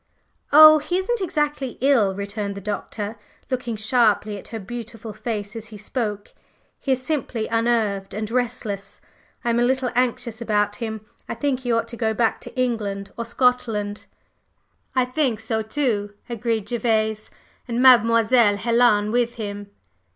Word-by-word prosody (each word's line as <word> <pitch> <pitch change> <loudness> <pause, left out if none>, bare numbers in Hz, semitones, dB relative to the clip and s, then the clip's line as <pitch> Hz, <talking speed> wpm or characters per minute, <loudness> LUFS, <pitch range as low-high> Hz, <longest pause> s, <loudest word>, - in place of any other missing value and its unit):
"Oh, 310 +1 +10
he 350 +4 -2
isn't 405 +4 -1
exactly 295 -7 -1
ill," 235 -8 +3
returned 200 0 -4
the - - -6
Doctor, 210 +2 -4 0.3
looking 245 -3 -2
sharply 215 -2 +2
at - - -11
her 225 - -6
beautiful 225 +1 -7
face 210 -2 -4
as 225 -1 -7
he 215 -1 -10
spoke. 210 -1 -4 0.5
"He 270 - +1
is 255 0 -4
simply 260 -7 -2
unnerved 225 -4 0
and 215 +1 -4
restless. 240 -5 -3 0.5
I 235 - +2
am 235 - +1
a - - +3
little 260 0 +1
anxious 245 -1 -1
about 210 -2 0
him. 220 -2 -5 0.2
I - - -3
think 260 +2 -1
he 245 -2 -2
ought 230 0 +1
to 235 - -7
go 220 -2 0
back 230 -1 +1
to - - -9
England 210 -5 -2
or 235 - -4
Scotland." 230 -4 0 0.9
"I 255 -1 +3
think 255 -4 0
so, 225 0 -2
too," 215 -3 -1
agreed 230 -3 -2
Gervase. 220 -2 0 0.4
"And 235 -1 -2
Mademoiselle 230 -3 +5
Helen 230 -2 +3
with 240 0 +1
him." 205 -2 -6
230 Hz, 155 wpm, -23 LUFS, 210-250 Hz, 0.9 s, Oh